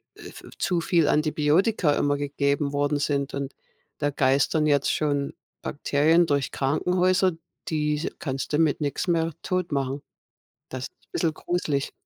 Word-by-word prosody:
äh, - - -15
v - - -12
zu 175 -3 0
viel 165 -3 +2
Antibiotika 155 +3 +2
immer 145 0 +1
gegeben 140 0 0
worden 145 +1 +1
sind 140 -1 -1
und 140 0 -4 0.5
da 145 - +1
geistern 140 +3 +2
jetzt 145 -2 +3
schon 145 -2 0 0.3
Bakterien 155 +4 +2
durch 140 -3 0
Krankenhäuser, 180 +6 +2 0.3
diese 150 0 0
kannst 135 0 -4
du - - +3
mit 160 -2 +2
nix 145 +4 -2
mehr 165 -1 +1
totmachen. 145 -7 -1 0.7
Das 130 -1 -5
ist - - -36
bissel 165 -2 0
gruselig. 155 -5 -2
150 Hz, 140 wpm, -25 LUFS, 140-165 Hz, 0.7 s, jetzt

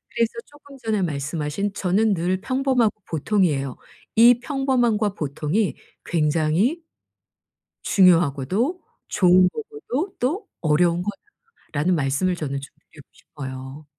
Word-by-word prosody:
그래서 230 -1 +2 0.2
쪼끔 285 -1 -16
전에 220 -5 -1
말씀하신 155 +4 -2
"저는 200 +3 +1
늘 180 +2 -1
평범하고 255 -3 +1
보통이에요.", 155 - 0 0.4
"이 235 +2 +7
평범함과 245 -6 +1
보통이 155 +5 -1 0.3
굉장히 165 - +1 1.0
중요하고도 180 - +3 0.3
좋은 180 -1 +5
거고도 405 - -5
또 310 - -1
어려운 170 +2 +2 0.5
거다."라는 175 - -2
말씀을 150 +5 0
저는 140 -4 -3
좀 140 +1 -12 0.2
드리고 145 - -15
싶어요. 130 0 -9
185 Hz, 275 characters per minute, -23 LUFS, 150-235 Hz, 1.0 s, 이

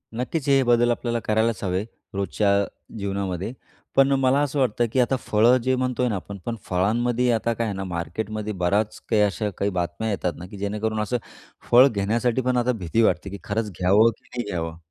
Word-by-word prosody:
नक्कीच. 135 +5 -3
हे 135 -1 +5
बदल 120 -1 +3
आपल्याला 120 0 -1
करायलाच 110 +1 +1
हवे 95 +1 0 0.3
रोजच्या 100 0 +1 0.3
जीवनामध्ये. 100 +1 -3 0.4
पण 135 0 +5
मला 130 +1 +3
असं 145 0 -1
वाटतं, 120 -2 +2
की 130 - +2
आता 125 +2 +3
फळं 115 +4 +4
जे 130 +1 +2
म्हणतोय 125 -1 0
ना, 105 - -1
आपण 100 +1 -6
पण 120 - -2
फळांमध्ये 120 +7 +1
आता 115 +1 +1
काय 115 0 -2
आहे 100 - -3
ना, 95 - -4
मार्केटमध्ये 100 +5 -4
बऱ्याच 100 +4 0
काही 110 -2 +3
अशा 105 +1 +1
काही 100 0 0
बातम्या 90 +4 -2
येतात 90 -4 -1
ना, 90 - -8
की 100 - -10
जेणेकरून 105 +2 -2
असं 115 +4 -1 0.5
फळ 125 +3 +8
घेण्यासाठी 115 +3 0
पण 125 0 0
आता 120 +1 +2
भीती 110 0 0
वाटते, 100 - +1
की 100 - -6
खरंच 105 0 -2
घ्यावं 100 +5 +5
की - - -33
नाही 120 -1 -2
घ्यावं? 80 -2 -3
110 Hz, 195 wpm, -24 LUFS, 100-120 Hz, 0.5 s, फळ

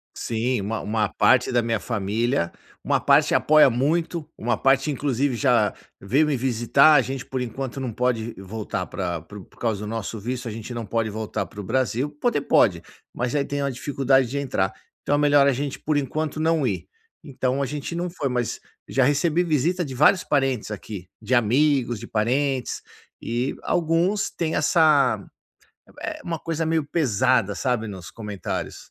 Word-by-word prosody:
Sim, 120 +1 -1
uma 110 +3 -3
uma 105 0 0
parte 130 0 +3
da 120 - +3
minha 115 -1 0
família, 110 -2 -1 0.3
uma - - +2
parte - - +4
apoia 155 -1 +6
muito, 155 +7 0
uma 120 +1 0
parte 135 +5 +2
inclusive 135 -1 0
já 120 -5 +2 0.3
veio 135 +11 +2
me 140 -4 0
visitar, 130 +5 +4
a - - +6
gente, 135 -1 -5
por 130 -1 -3
enquanto, 125 +2 -5
não 130 -3 -3
pode 115 -1 -1
voltar 105 +3 -4
pra 85 -2 -4
pro 100 +4 -11
por - - -23
causa 110 -4 -1
do 105 - -5
nosso 110 0 -4
visto, 125 +3 -4
a - - -3
gente 110 +2 -7
não 115 -1 -4
pode 110 +1 -1
voltar 110 0 -4
para 105 - -12
o - - -4
Brasil. 130 +5 0
Poder 240 -12 +1
pode, - - +3 0.3
mas 125 +2 -3
aí 145 -1 +1
tem 145 0 -3
uma 140 - 0
dificuldade 135 0 +1
de 140 +4 -4
entrar, 125 -9 0 0.3
então 145 - +1
é - - +2
melhor 145 -1 +5
a - - +5
gente, 140 +2 -3
por 155 -1 0
enquanto, 155 +2 -2
não 160 -3 +2
ir. 100 -6 -2 0.4
Então 135 -2 -2
a 140 - +1
gente 150 +4 -5
não 175 +1 -2
foi, 145 -6 -3
mas 125 -2 -2 0.3
já 135 - +2
recebi 150 +6 +2
visita 170 +3 +1
de 135 -4 -6
vários 180 +8 +4
parentes 135 - 0
aqui. 100 -3 -7
De 120 +4 -2
amigos, 120 0 +2
de 115 - -8
parentes, 130 +4 -1 0.4
e 120 +3 -2
alguns 175 +5 +1
têm 160 -1 -2
essa, 155 -2 +3 0.8
eh, - - -5
uma 165 -2 -3
coisa 165 0 -2
meio 160 -1 +1
pesada, 130 - +1
sabe, 120 -1 -1
nos 95 -4 -8
comentários. 105 -4 -5
130 Hz, 180 wpm, -24 LUFS, 115-145 Hz, 0.8 s, apoia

